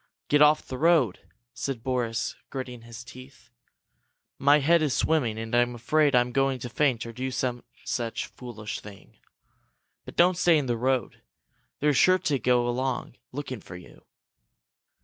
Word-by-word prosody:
"Get 145 0 +4
off 150 +1 +5
the 130 - -6
road," 155 - +3 0.3
said 130 -2 -4
Boris, 120 -3 -1
gritting 125 -3 -6
his 115 0 -10
teeth. 125 0 -14 0.9
"My 145 +2 +5
head 165 +3 +3
is 150 -4 +1
swimming, 125 -9 +1
and 115 +1 -6
I'm 120 0 +2
afraid 145 +4 +2
I'm 125 0 +3
going 135 +1 +1
to 120 - -5
faint 125 -3 +1
or 115 - -8
do 130 +3 -3
some 125 -1 -2 0.2
such 120 -1 -2
foolish 115 -4 -7
thing! 100 -1 -14 0.8
But - - -11
don't 175 0 +4
stay 175 -2 +5
in 145 - 0
the 120 -2 0
road. 130 +1 -1 0.6
They're 150 0 +3
sure 185 +7 +5
to 145 -6 -1
go 125 -1 +2
along, 125 0 -2
looking 130 -4 -6
for 90 - -11
you." 90 -1 -14
125 Hz, 160 wpm, -26 LUFS, 120-145 Hz, 0.9 s, off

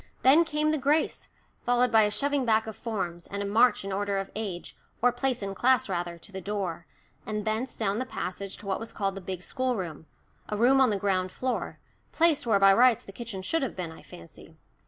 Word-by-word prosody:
Then 295 +6 +6
came 305 -1 0
the 310 - 0
grace, 290 +4 +1 0.4
followed 245 0 +2
by 225 -1 +6
a - - +1
shoving 285 +5 0
back 220 -2 +2
of 220 -1 -7
forms, 175 -7 -4
and 200 0 -4
a - - -3
march 220 +1 +3
in 195 - -4
order 200 +1 -1
of 195 0 -4
age, 200 -5 -5 0.2
or 245 +1 +4
place 255 -3 -1
in 195 0 -3
class 255 +6 +3
rather, 175 -2 -3
to 170 - -13
the 190 -1 -6
door, 185 -5 -4 0.4
and 210 0 -4
thence 220 +4 -2
down 210 -1 -1
the 255 - -2
passage 195 -3 -5
to 210 - -13
what 195 -1 -1
was 225 - -8
called 195 -2 -1
the 195 - -7
big 185 -1 -5
schoolroom 190 - -3 0.4
a 210 - -2
room 260 +4 +5
on 260 - +5
the 205 - 0
ground 185 -2 0
floor, 255 +4 -3 0.4
placed 320 -6 +2
where 220 -3 +4
by 195 0 +6
rights 245 +1 +5
the - - -11
kitchen 200 -3 -7
should 325 +12 0
have 265 - -3
been, 175 -3 -4
I 160 - -12
fancy. 85 - -14
210 Hz, 220 wpm, -28 LUFS, 195-250 Hz, 0.4 s, Then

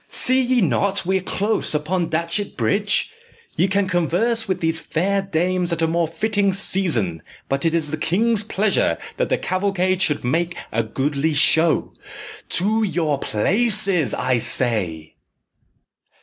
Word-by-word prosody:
"See 260 +1 +2
ye 250 -1 +1
not 195 +1 0
we 190 +1 +1
are - - -9
close 205 -2 0
upon 165 +3 -1
Datchet 170 +5 -1
Bridge? 205 - +1 0.4
Ye 185 - +2
can 195 0 0
converse 190 +7 0
with 185 -2 -2
these 165 -1 -1
fair 195 +6 -1
dames 180 -1 -1
at 165 -1 -1
a - - +2
more 165 0 0
fitting 205 +3 0
season; 160 - +2 0.3
but 135 +3 -1
it 165 0 +1
is 155 -3 -2
the 155 - -3
king's 210 +8 +1
pleasure 210 -1 0 0.2
that - - -1
the - - +1
cavalcade 185 -1 -1
should 150 -5 +2
make 165 +8 -1
a 115 - 0
goodly 140 +6 -2
show. 160 +3 +3 0.6
To 215 +5 +1
your 160 -8 -1
places, 190 - +1
I 130 -2 0
say!" 100 -11 -2
180 Hz, 150 wpm, -20 LUFS, 155-200 Hz, 0.6 s, show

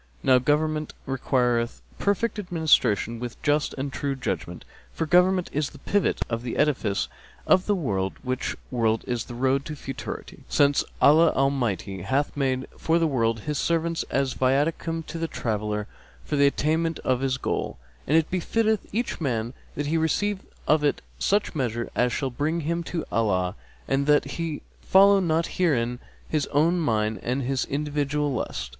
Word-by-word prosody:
Now 130 -1 +5
government 150 +3 0
requireth 125 -2 0 0.2
perfect 210 +2 0
administration 160 - +2
with 120 0 -6
just 145 +1 +1
and 135 0 -3
true 140 -1 -2
judgment; 130 - -4 0.3
for 165 - -2
government 180 +2 +3
is 150 0 0
the - - -14
pivot 205 -2 0
of 115 -1 -2
the 120 -1 -4
edifice 120 -9 +1 0.4
of 185 - +4
the 205 - +3
world, 100 - -1
which 130 0 -2 0.2
world 115 -3 +1
is 120 -2 -2
the 120 - -8
road 135 +2 +1
to 155 - -5
futurity; 135 -2 -7
since 145 0 +3 0.2
Allah 155 +3 +6
Almighty 115 -9 0
hath 140 +8 0
made 130 -2 0 0.2
the 165 +1 +3
world 115 -6 +1
for - - -16
His 150 -1 -1
servants 165 0 0
as 135 -1 0
viaticum 155 +5 0
to 165 - -6
the 165 - -1
traveller 105 -5 -2 0.4
for - - -2
the 140 0 +5
attainment 160 +3 +1
of 130 -1 +1
his 130 -1 0
goal; - - -2 0.3
and 155 - +4
it 160 -1 +1
befitteth 220 +4 0
each 230 -3 -2
man 120 -4 -1 0.2
that 145 - -2
he 160 +3 +1
receive 200 +5 0 0.3
of 150 0 +4
it 145 - +1 0.2
such 205 +1 +1
measure 120 -6 -2
as 125 0 +2
shall 135 0 -2
bring 155 +6 -1
him 170 +3 -1
to 165 -1 -3
Allah, 95 -4 +1 0.3
and 135 +1 +1
that 150 0 +4
he 165 -3 -4 0.2
follow 200 +1 +6
not 165 -2 +1
herein 125 -9 0 0.3
his 155 -2 0
own 165 +5 +2
mind 110 - 0
and 130 +3 -1
his 130 +1 0
individual 145 0 -1
lust. - - -3
140 Hz, 165 wpm, -25 LUFS, 125-165 Hz, 0.4 s, Allah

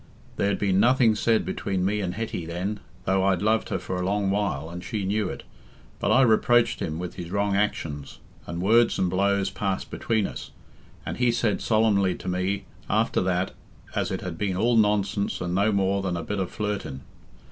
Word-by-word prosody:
There'd 100 0 +1
been 95 -2 +2
nothing 120 0 +5
said 110 +1 +2
between 95 -2 -2
me 105 +2 0
and 90 -2 -3
Hetty 110 -5 -3
then, 95 +5 -3 0.3
though 95 0 +2
I'd 95 -1 +2
loved 110 +1 +2
her - - 0
for 90 - -4
a 90 - -2
long 100 +1 +1
while, 100 -8 -1
and 90 +1 -7
she 105 -3 -3
knew 100 0 0
it. - - -7 0.6
But - - 0
I 135 - +6
reproached 120 0 +3
him 80 0 -3
with 90 0 -6
his 85 -1 -6
wrong 100 +1 0
actions, 80 -8 -2 0.3
and 85 +2 -4
words 115 +4 +4
and 90 -2 +1
blows 100 +1 +1
passed 95 -2 -3
between 110 -3 0
us; - - -6 0.6
and - - -4
he 125 -1 +3
said 115 -3 0
solemnly 105 -4 +2
to - - -10
me, 90 +2 -1 0.2
after - - +2
that, 90 0 0 0.4
as - - -1
it - - -3
had 85 -3 -6
been 95 -3 -1
all 120 +4 +2
nonsense 105 -2 +1
and 90 -1 -3
no 100 +4 +3
more 100 0 +1
than 90 -3 -2
a 85 - -4
bit 105 +3 -3
o' 95 - 0
flirting. 105 -11 -4
100 Hz, 200 wpm, -25 LUFS, 90-105 Hz, 0.6 s, I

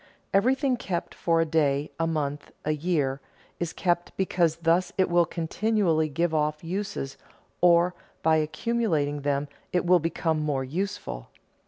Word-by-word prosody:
Everything 255 +6 +3
kept 175 -6 -3
for 165 -1 +1
a - - +2
day, 150 -2 +1
a 165 - +1
month, 145 -3 -2 0.2
a 155 - +1
year, 150 -4 0 0.4
is 170 -2 -2
kept 175 -1 -1
because 175 -4 +2
thus 170 +2 +2
it 190 -2 +2
will 175 -1 +4
continually 170 -2 +1
give 165 +3 0
off 150 0 0
uses 175 -6 -4 0.4
or 175 0 +5 0.3
by 160 0 +4
accumulating 155 -4 0
them 140 0 0 0.2
it 180 0 +1
will 180 0 +5
become 160 -1 -1
more 145 -3 0
useful. 145 - -4
165 Hz, 145 wpm, -27 LUFS, 150-180 Hz, 0.4 s, or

